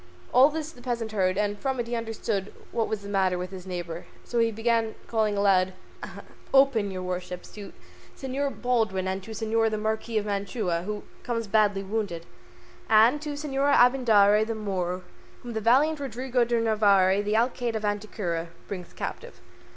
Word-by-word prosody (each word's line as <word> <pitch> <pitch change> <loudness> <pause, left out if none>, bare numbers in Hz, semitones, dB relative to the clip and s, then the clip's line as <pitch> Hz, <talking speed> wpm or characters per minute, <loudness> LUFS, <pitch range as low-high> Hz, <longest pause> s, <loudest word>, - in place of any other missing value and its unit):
All 260 +4 +7
this 315 0 -4
the 250 - -16
peasant 235 -3 -3
heard, 185 -3 +1
and 205 0 0
from 265 -2 -2
it 240 - -1
he 235 - -6
understood 225 -3 -2
at - - -14
last - - -20
what 225 -1 0
was 210 -2 -3
the - - -7
matter 190 -2 +1
with 180 +1 -5
his 190 -1 -9
neighbour, 175 -2 -5 0.2
so 240 - -2
he 230 0 +4
began 225 0 0
calling 215 -3 0
aloud, 190 -2 +3 0.8
"Open, 270 -7 +4
your 185 -1 -5
worships, 180 0 -5
to 205 -2 -9 0.5
Señor 275 +1 -3
Baldwin 220 -7 +1
and 190 +1 -2
to 190 - -12
Señor 225 +1 +1
the 215 - -2
Marquis 220 +1 -2
of 210 - 0
Mantua, 200 -3 -1
who 210 -1 -4 0.2
comes 230 -2 -2
badly 205 -1 +2
wounded, 195 -5 -3 0.6
and 225 +6 +5
to 300 -1 -4
Señor 285 -1 +1
Abindarraez, 220 -4 +5
the 225 - -2
Moor, 185 -4 -3 0.4
whom 240 -1 -6
the 220 - -2
valiant 285 +8 +3
Rodrigo 255 -1 -1
de 235 0 +1
Narvaez, 205 -3 +3
the 210 +1 0
Alcaide 240 0 0
of 215 -1 -2
Antequera, 205 -5 -2 0.2
brings 180 -3 -7
captive." 485 +1 -6
215 Hz, 180 wpm, -26 LUFS, 195-240 Hz, 0.8 s, All